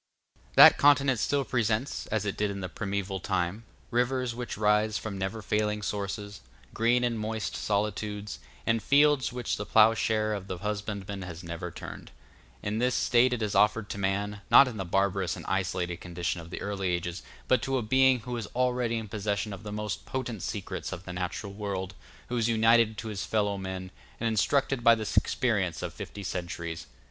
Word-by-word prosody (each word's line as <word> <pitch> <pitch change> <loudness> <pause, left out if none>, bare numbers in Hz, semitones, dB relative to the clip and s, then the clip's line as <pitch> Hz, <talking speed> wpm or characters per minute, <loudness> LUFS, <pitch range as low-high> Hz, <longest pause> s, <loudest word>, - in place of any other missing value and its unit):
That - - +9
continent 140 -3 +5
still 140 +3 +1
presents, 115 +2 -1
as 105 -1 -1
it 100 - -2
did 105 0 0
in 100 -1 -5
the 90 - -3
primeval 100 0 -3
time, 95 +4 -2 0.3
rivers 125 0 +1
which 120 +1 -5
rise 105 0 +2
from 110 -2 -5
never 95 +3 -3
failing 105 0 0
sources, 100 0 -4 0.3
green 120 +2 +2
and 120 -2 0
moist 110 0 -3
solitudes, 105 0 -2 0.3
and 115 0 +2
fields 145 0 +4
which 125 -2 -2
the 105 - -4
ploughshare 110 -1 +4
of 100 -2 -5
the 95 - -4
husbandman 100 0 -4
has 90 -2 -7
never 85 +1 -5
turned. - - -9 0.5
In 105 +2 -1
this 125 +1 +2
state 125 +1 +4
it 120 -3 -1
is 105 - -1
offered 105 0 +3
to 100 - -5
man, 100 +1 -1
not 140 - +8
in 120 -4 -5
the 95 - -3
barbarous 95 0 +1
and - - -9
isolated 90 -2 -1
condition 85 0 -3
of 85 - -12
the - - -6
early 100 -2 -2
ages, 85 0 -2 0.3
but 130 - +3
to 135 0 0
a 125 - -1
being 130 +2 +4
who 125 +2 -5
is 110 -3 -4
already 125 -2 +1
in 110 -1 -4
possession 105 0 -2
of 100 - -8
the 105 -1 -7
most 105 0 -4
potent 125 -6 -4
secrets - - -4
of 95 0 -7
the 90 - -6
natural 90 +3 -4
world, 100 -2 -4 0.4
who 125 - -1
is 115 0 +1
united 115 -1 +4
to 110 - -5
his 100 -2 -4
fellow 105 -2 0
men, 95 -1 -5 0.3
and 115 - 0
instructed 130 +3 +1
by 115 -1 +7
the 110 -2 -4
experience 100 -9 +1
of - - -4
fifty 100 - -8
centuries. 85 -2 -5
105 Hz, 190 wpm, -28 LUFS, 95-115 Hz, 0.5 s, That